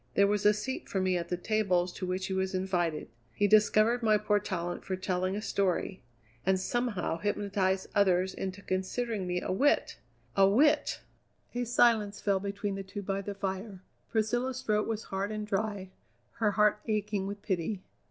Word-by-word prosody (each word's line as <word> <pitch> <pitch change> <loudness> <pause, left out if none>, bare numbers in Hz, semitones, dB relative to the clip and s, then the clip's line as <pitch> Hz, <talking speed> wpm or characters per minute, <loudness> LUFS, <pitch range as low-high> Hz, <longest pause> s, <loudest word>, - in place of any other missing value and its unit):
There 200 - +6
was 205 0 +2
a - - +8
seat 260 +5 -4
for 195 - -1
me 185 -1 +1
at 170 -1 -3
the 180 - -1
tables 185 -3 +1
to 185 - -5
which 185 +1 -2
he 190 - -3
was 190 0 -1
invited; 175 -4 -1 0.3
he 205 - +2
discovered 215 +3 +4
my 215 -2 +4
poor 210 0 +2
talent 175 -3 -4
for 190 - -2
telling 185 0 -1
a 210 - -4
story, 195 -1 -1 0.4
and 190 0 +2
somehow 210 -6 -1
hypnotized 200 -2 0
others 190 -2 +3
into 190 +1 -5
considering 190 +2 -2
me 180 0 -1
a - - -3
wit! 275 +10 +2 0.4
A 195 0 +6
wit!" 295 +8 +3 0.5
A 245 0 -1
silence 225 -4 +3
fell 200 -2 +1
between 200 +1 -3
the 195 - -4
two 195 +1 -7
by 195 0 -2
the 200 0 -5
fire. 195 0 -4 0.3
Priscilla's 240 +4 0
throat 210 -1 +1
was 225 -1 -2
hard 195 +2 -3
and 215 0 -3
dry, 200 -2 -2 0.5
her 220 -2 +3
heart 210 0 +3
aching 210 -2 -1
with 200 0 -6
pity. 190 0 -2
200 Hz, 180 wpm, -30 LUFS, 185-215 Hz, 0.5 s, a